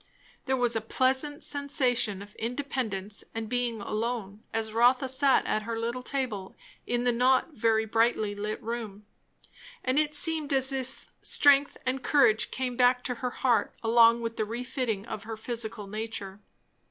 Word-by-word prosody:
There 265 0 +1
was 245 -2 +3
a 225 - 0
pleasant 265 +6 0
sensation 250 -8 -1
of 205 +1 -15
independence 225 -5 -3
and 225 -1 -3
being 240 -2 -1
alone, 215 -1 -3
as 220 -1 -2
Rotha 250 +4 +4
sat 265 +1 +3
at 215 - 0
her 230 +2 -4
little 235 +2 -2
table 250 -8 -3 0.3
in 240 0 0
the 245 - +3
not 255 +6 +2
very 220 -3 +2
brightly 220 -1 +1
lit 210 +1 -4
room; 215 -3 -5 0.8
and 260 +3 +2
it 305 0 0
seemed 310 -2 0
as 265 0 +2
if 265 0 -6
strength 285 0 +4
and 255 +1 -1
courage 245 -5 +3
came 255 -1 -3
back 250 0 +3
to 250 - -2
her 250 - 0
heart 245 -1 +1
along 230 +1 +5
with 230 0 -4
the - - +1
refitting 235 -2 -3
of 215 - -6
her 225 0 -5
physical 225 -2 -4
nature. 205 -1 -5
240 Hz, 160 wpm, -28 LUFS, 220-260 Hz, 0.8 s, along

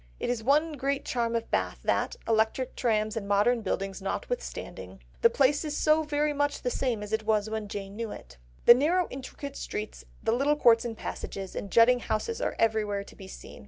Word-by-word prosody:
It - - -1
is 240 -2 -2
one 300 +5 +3
great 275 +1 -1
charm 235 -2 -1
of 230 0 -3
Bath - - -1
that, - - 0
electric 225 +3 +1
trams 215 -2 0
and 210 -3 -4
modern 210 +4 +3
buildings 195 -1 -3
notwithstanding, - - -5 0.2
the 465 - +7
place 290 - +2
is 300 -1 -3
so 310 +1 +4
very 300 0 0
much 290 0 -1
the 250 - 0
same 240 -6 -1
as 210 +1 -7
it 220 - +1
was 215 -1 0
when 220 -1 -3
Jane 200 -1 -6
knew 230 0 -4
it. - - -10 0.3
The - - +11
narrow 330 +8 +2
intricate 275 +1 -7
streets, 210 0 -5 0.2
the 225 - +2
little 275 +5 +2
courts 235 -4 +5
and 225 -2 -4
passages, 195 -1 -6
and 200 - -4
jutting 235 +4 +5
houses 245 - -2
are - - -1
everywhere 215 -3 +1
to - - -15
be 190 - -11
seen. - - -11
230 Hz, 200 wpm, -28 LUFS, 215-280 Hz, 0.3 s, The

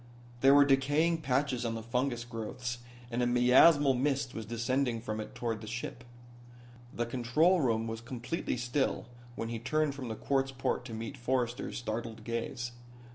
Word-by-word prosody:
There 135 +2 +6
were 145 0 +7
decaying 145 +5 +3
patches 135 -2 0
on 115 -1 -1
the 115 - -5
fungus 120 +1 -1
growths 120 +1 -5 0.3
and 120 +1 0
a 120 - +2
miasmal 130 +4 +6
mist 135 0 0
was 110 -2 -6
descending 120 +1 0
from 110 -1 -4
it 110 - -7
toward 115 -3 -2
the 110 - -8
ship. 120 +2 -5 0.9
The 120 - -2
control 130 +9 +2
room 115 -4 +1
was 115 0 -4
completely 125 +4 -3
still 125 +3 -1 0.3
when 115 - -4
he 115 -1 -3
turned 150 +4 0
from 135 -3 -6
the 110 - -4
quartz 135 +3 0
port 130 -1 -2
to 115 -3 -6
meet 115 +5 -6
Forrester's 125 -1 -1
startled 115 -1 -4
gaze. 115 +1 -3
125 Hz, 170 wpm, -31 LUFS, 115-135 Hz, 0.9 s, were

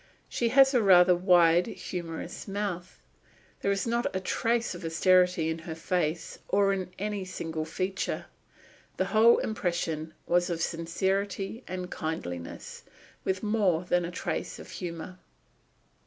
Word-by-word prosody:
She 235 - 0
has 270 +2 +6
a 245 - +4
rather 180 -3 +7
wide, 175 -1 +5
humorous 170 +1 -6
mouth. 195 -3 -4 0.6
There - - 0
is 195 0 0
not 235 +1 0
a - - +1
trace 230 +4 0
of 175 0 -9
austerity 180 0 +3
in 160 0 -2
her 160 0 -7
face 165 -1 -2
or 195 0 +3
in 185 -2 -3
any 205 -1 -3
single 160 -4 -4
feature. 185 +4 -3 0.7
The - - +1
whole 225 +2 +7
impression 170 -6 -2
was 175 +1 +2
of 170 -2 -2
sincerity 195 +6 -2
and 180 0 -5
kindliness, 90 - -5 0.4
with 190 +1 -1
more 205 -6 +2
than 175 0 +2
a 170 - -3
trace 180 - -4
of - - -11
humour. 175 +1 -6
180 Hz, 140 wpm, -28 LUFS, 165-200 Hz, 0.7 s, rather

